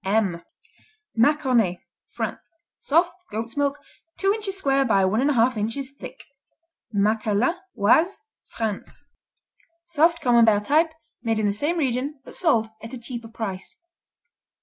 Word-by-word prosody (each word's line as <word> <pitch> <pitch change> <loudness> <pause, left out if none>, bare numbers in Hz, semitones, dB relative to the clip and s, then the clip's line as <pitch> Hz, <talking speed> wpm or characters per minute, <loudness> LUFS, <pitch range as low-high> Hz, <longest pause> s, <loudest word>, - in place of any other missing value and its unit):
M 195 -4 +1 0.7
Maconnais 235 -7 +3 0.3
France - - -5 0.3
Soft; 340 +4 +2 0.2
goat's 225 +2 -5
milk; 285 0 0 0.4
two 390 +1 +2
inches 415 -3 -2
square 275 -6 +2
by 195 -7 +3
one 215 +5 +1
and 280 - +2
a - - +3
half 245 +1 +3
inches 230 +6 -3
thick. 280 - -11 0.7
Macqueline 215 +4 +1 0.3
Oise, 315 - +3 0.3
France 220 +5 -5 0.8
Soft 335 0 +2
Camembert 230 -5 +4
type, 320 +5 +3 0.3
made 225 -2 0
in 215 - 0
the 200 - +1
same 295 +11 -1
region, 275 0 -1
but - - -12
sold 240 -11 +2
at 225 +3 -9
a - - -4
cheaper 235 -1 -7
price. 210 -4 -6
240 Hz, 135 wpm, -24 LUFS, 215-290 Hz, 0.8 s, Camembert